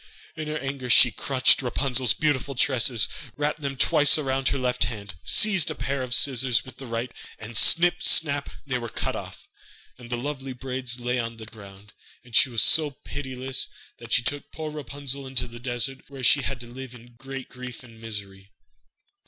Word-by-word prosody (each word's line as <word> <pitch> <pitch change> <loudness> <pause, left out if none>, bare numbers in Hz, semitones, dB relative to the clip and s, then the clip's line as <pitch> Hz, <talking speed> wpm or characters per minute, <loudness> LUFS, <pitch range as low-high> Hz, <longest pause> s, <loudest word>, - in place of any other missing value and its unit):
In 155 -1 -5
her 155 0 -2
anger 135 -2 -5
she 120 0 +7
clutched 130 +4 +2
Rapunzel's 125 -3 0
beautiful 140 -2 0
tresses, 120 -4 +2 0.3
wrapped 150 +1 -1
them 140 -1 -4
twice 150 +3 +5
round 135 -2 -1
her - - +1
left 125 -1 +1
hand, 105 -5 -6
seized 190 -8 +4
a 155 - -4
pair 140 -1 -2
of 125 -2 0
scissors 130 -3 +2
with 130 - -12
the 135 - -9
right, 115 +1 -3 0.3
and 110 +1 -8
snip, 175 +9 +5
snap, 145 -2 +3 0.2
they 130 -3 -2
were 115 -1 -6
cut - - -3
off, - - -9 0.5
and 120 -1 -12
the 120 - -2
lovely 135 0 -5
braids 125 -1 -3
lay 125 +1 -1
on 115 -1 -4
the 110 - -9
ground. 100 -1 -14 0.3
And 120 -2 -9
she 130 - +5
was 115 -3 +3
so 155 -2 +6 0.2
pitiless 130 -1 -2 0.3
that 115 -1 -11
she 125 - +3
took 145 +4 -4
poor 155 -1 -6
Rapunzel 140 -2 -4
into 130 -1 +1
a 120 0 -11
desert 125 +2 -2
where 135 -2 -9
she 140 +4 +5
had 135 0 -4
to 120 - -8
live 125 +1 -9
in 120 0 -15
great 135 +2 -8
grief 125 -1 -9
and 115 -2 -15
misery. 100 -3 -7
130 Hz, 190 wpm, -25 LUFS, 120-140 Hz, 0.5 s, she